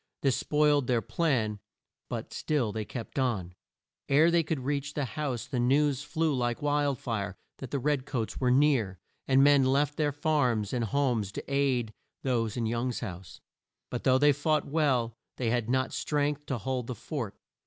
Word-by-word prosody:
This 135 -3 +3
spoiled 150 -3 +2
their 120 -2 +1
plan, 115 -6 0 0.5
but - - -5
still 140 -8 0
they 110 0 -3
kept 120 +4 -6
on. 105 -9 -1 0.6
Ere 155 +5 +5
they 170 0 +4
could 155 -3 -2
reach 145 +2 -2
the 145 - 0
house, 130 0 -3
the 130 -2 -3
news 140 +2 +2
flew 160 +1 0
like 120 -2 -1
wild 145 -2 +1
fire 110 -8 -3 0.2
that 135 - -7
the 140 - -1
red 140 0 0
coats 115 -5 -3
were 125 - +2
near, 125 -8 +3 0.3
and 135 0 +5
men 145 -1 +6
left 140 +3 +2
their 150 -2 +1
farms 130 -8 +1
and 120 -2 0
homes 120 -5 0
to - - -5
aid 135 -5 +1 0.3
those 115 -5 0
in 115 - 0
Young's 120 +2 -1
house. 95 -6 -8 0.5
But 125 - -3
though 130 0 +5
they 145 +2 +5
fought 150 +1 +1
well, 135 -7 +1 0.2
they 120 -3 0
had 120 -2 0
not 130 +1 +1
strength 145 0 -1
to 135 - -1
hold 125 +2 -3
the 125 - -4
fort. 115 -2 -5
130 Hz, 180 wpm, -29 LUFS, 115-145 Hz, 0.6 s, men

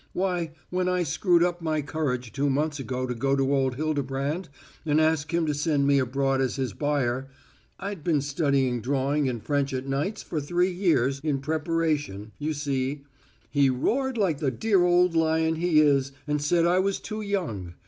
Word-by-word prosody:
Why, 175 -4 -1 0.2
when 180 0 0
I 180 -1 +1
screwed 170 +3 +2
up 175 0 -1
my 155 -2 -1
courage 130 -6 -2
two 140 +1 0
months 150 +2 0
ago 130 -1 -3
to 125 - -3
go 135 +3 +1
to 135 0 +1
old 135 -2 +1
Hildebrand 145 +2 -2 0.3
and 155 -1 +2
ask 155 0 +1
him 170 -1 +1
to 150 - 0
send 145 -1 +1
me 140 0 +4
abroad 135 +1 0
as 130 - 0
his 130 -6 -2
buyer 135 -2 -1 0.5
I'd 195 -5 -5
been 155 -4 +2
studying 140 -4 0
drawing 140 +3 0
and 120 -3 -5
French 140 -2 0
at 130 +1 -3
nights 140 +10 -2
for 155 - -3
three 175 +5 +1
years 155 -8 +1
in 150 -3 0
preparation, 150 - -1
you 155 +1 -1
see 140 0 -2 0.5
he 140 -2 +4
roared 250 - 0
like 180 -9 +1
the 140 - +1
dear 195 - +2
old 180 0 +4
lion 160 0 +2
he 165 -2 +3
is 140 -2 +3
and 150 -1 -1
said 165 +3 +2
I 175 +2 +3
was 195 +1 0
too 215 0 -5
young. 135 - -3
150 Hz, 185 wpm, -26 LUFS, 135-170 Hz, 0.5 s, me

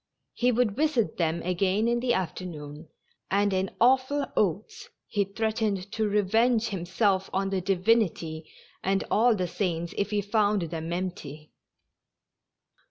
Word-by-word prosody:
He 245 +1 +2
would 230 -4 +1
visit 290 -6 +1
them 165 -1 0
again 190 +4 +1
in 240 0 +1
the 245 0 0
after 185 -1 -3
noon, 150 -2 -8 0.4
and, 200 +1 +2
in 190 0 0
awful 260 +4 +3
oaths, 200 +1 -1 0.2
he 205 -2 0
threatened 210 -2 -2
to 220 -1 0
revenge 225 +3 +2
him 180 -4 -4
self 195 0 +1
on 195 0 -1
the 190 -1 0
Divinity 180 -5 0 0.3
and 195 +1 +1
all 230 +2 +4
the 185 -3 -1
saints 170 -3 -2
if 200 - 0
he 210 -1 0
found 205 -1 +1
them 165 0 -5
empty. 155 -4 -5
195 Hz, 145 wpm, -27 LUFS, 175-220 Hz, 0.4 s, all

